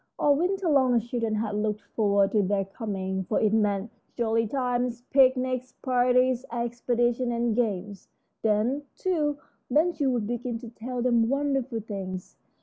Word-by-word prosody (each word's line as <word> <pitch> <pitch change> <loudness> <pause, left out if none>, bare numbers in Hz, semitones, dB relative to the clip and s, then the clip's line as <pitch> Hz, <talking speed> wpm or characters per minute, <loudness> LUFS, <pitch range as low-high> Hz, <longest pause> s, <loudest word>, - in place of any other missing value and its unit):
All 290 -1 +4
winter 370 +4 0
long 265 -5 +4
the 235 - +4
children 230 -1 -2
had 215 -1 -2
looked 210 0 -1
forward 200 -2 +3
to 215 - +3
their 195 0 0
coming, 190 -2 -4
for 215 - 0
it 215 -1 +2
meant 210 0 +1 0.2
jolly 230 -1 +1
times: 245 -1 -1
picnics, 255 -1 +3
parties, 250 0 +2
expeditions, 240 +1 0
and 235 -1 0
games. 205 -4 -2 0.3
Then, 220 +6 +1
too, 305 -6 0 0.3
Ben 310 +7 +3
Gile 285 -5 0
would 240 -4 0
begin 240 +1 -3
to 235 0 -9
tell 240 +2 -5
them 235 -2 +3
wonderful 270 -4 0
things. 190 -3 -6
240 Hz, 150 wpm, -27 LUFS, 215-255 Hz, 0.3 s, All